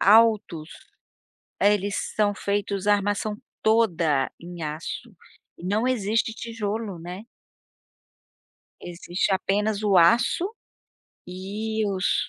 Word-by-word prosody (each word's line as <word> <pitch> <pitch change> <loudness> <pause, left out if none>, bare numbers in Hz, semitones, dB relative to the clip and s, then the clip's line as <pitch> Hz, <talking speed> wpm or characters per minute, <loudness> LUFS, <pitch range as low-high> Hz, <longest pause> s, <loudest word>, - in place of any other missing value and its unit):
altos, 210 -7 +4 0.9
eh, 205 +1 +5
eles 200 0 -1 0.2
são 205 -1 +2
feitos 200 -1 -2
a 205 - +7
armação 205 +1 0 0.3
toda 170 -11 +2
em 175 0 -9
aço 160 +8 -5 0.4
e - - -13
não 215 +6 +1
existe 225 -2 +1
tijolo, 220 -4 -4
né. 180 +5 -7 1.6
Existe 175 +2 -2
apenas 205 +2 0
o 200 -3 +3
aço 235 - +4 0.8
e 210 +4 -3
os 190 -1 0
205 Hz, 105 wpm, -25 LUFS, 180-220 Hz, 1.6 s, a